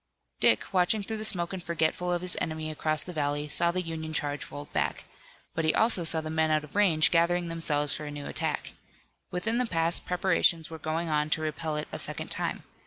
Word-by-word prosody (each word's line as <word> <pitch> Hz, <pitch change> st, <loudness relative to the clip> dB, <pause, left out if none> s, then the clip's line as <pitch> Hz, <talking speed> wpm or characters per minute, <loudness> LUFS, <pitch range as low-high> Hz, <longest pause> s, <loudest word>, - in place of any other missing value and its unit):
Dick, -, -, +4 dB
watching 190 Hz, +3 st, +3 dB
through 220 Hz, +2 st, -4 dB
the 215 Hz, -, -5 dB
smoke 175 Hz, -4 st, +1 dB
and 185 Hz, -2 st, -5 dB
forgetful 170 Hz, +1 st, 0 dB
of 175 Hz, 0 st, -1 dB
his 180 Hz, -, +2 dB
enemy 155 Hz, 0 st, -3 dB
across 155 Hz, -1 st, 0 dB
the 180 Hz, -, -8 dB
valley, 145 Hz, -1 st, -1 dB
saw 170 Hz, +3 st, +4 dB
the 180 Hz, +1 st, -1 dB
Union 160 Hz, -1 st, -5 dB
charge 145 Hz, -2 st, -2 dB
rolled 145 Hz, 0 st, -9 dB
back. -, -, -1 dB, 0.5 s
But 165 Hz, -, -1 dB
he 155 Hz, -, +2 dB
also 220 Hz, -5 st, +3 dB
saw 160 Hz, 0 st, +4 dB
the 155 Hz, 0 st, -5 dB
men 160 Hz, 0 st, +1 dB
out 155 Hz, -1 st, +2 dB
of 150 Hz, -, -13 dB
range 165 Hz, -7 st, +4 dB
gathering 175 Hz, 0 st, +2 dB
themselves 150 Hz, -3 st, 0 dB
for 150 Hz, -, -6 dB
a -, -, -5 dB
new 145 Hz, -1 st, -7 dB
attack. -, -, -1 dB, 0.6 s
Within 225 Hz, +7 st, -1 dB
the 250 Hz, -, +1 dB
pass 165 Hz, -2 st, +2 dB
preparations 175 Hz, -3 st, +1 dB
were 160 Hz, -, -7 dB
going 160 Hz, +2 st, -2 dB
on 150 Hz, 0 st, +1 dB
to 155 Hz, -, 0 dB
repel 155 Hz, 0 st, -2 dB
it 150 Hz, -, -3 dB
a -, -, -5 dB
second -, -, -4 dB
time. -, -, -1 dB
165 Hz, 220 wpm, -28 LUFS, 155-175 Hz, 0.6 s, Dick